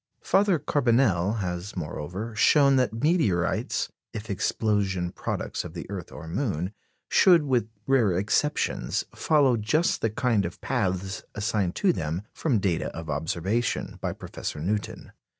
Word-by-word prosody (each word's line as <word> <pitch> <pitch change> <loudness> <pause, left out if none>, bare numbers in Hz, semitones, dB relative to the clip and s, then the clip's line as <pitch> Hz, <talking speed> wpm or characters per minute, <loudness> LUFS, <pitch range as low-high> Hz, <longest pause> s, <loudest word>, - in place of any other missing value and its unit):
Father 195 -2 +3
Carbonelle 120 - +2
has, 90 +2 -4
moreover, 90 +7 -5
shown 140 +5 +5
that 125 -4 +2
meteorites, 135 - +1 0.2
if 110 -1 -5
explosion 95 -3 0
products - - -3
of - - -9
the - - -6
earth - - -6
or - - -9
moon, 95 - -2 0.3
should, 175 -4 +6
with 125 -6 +1 0.2
rare 130 -7 +3
exceptions, 110 +10 0
follow 140 -6 +3
just 150 +11 +1
the 115 - +2
kind 110 -1 +1
of 85 -1 -5
paths 95 -6 -1
assigned 105 -4 0
to 190 -3 +3
them, 80 - -3
from 140 -8 +1
data 95 -5 0
of 80 -2 -5
observation, 85 - -1
by - - -1
Professor 75 - -6
Newton. 100 +6 -3
105 Hz, 135 wpm, -26 LUFS, 90-130 Hz, 0.3 s, should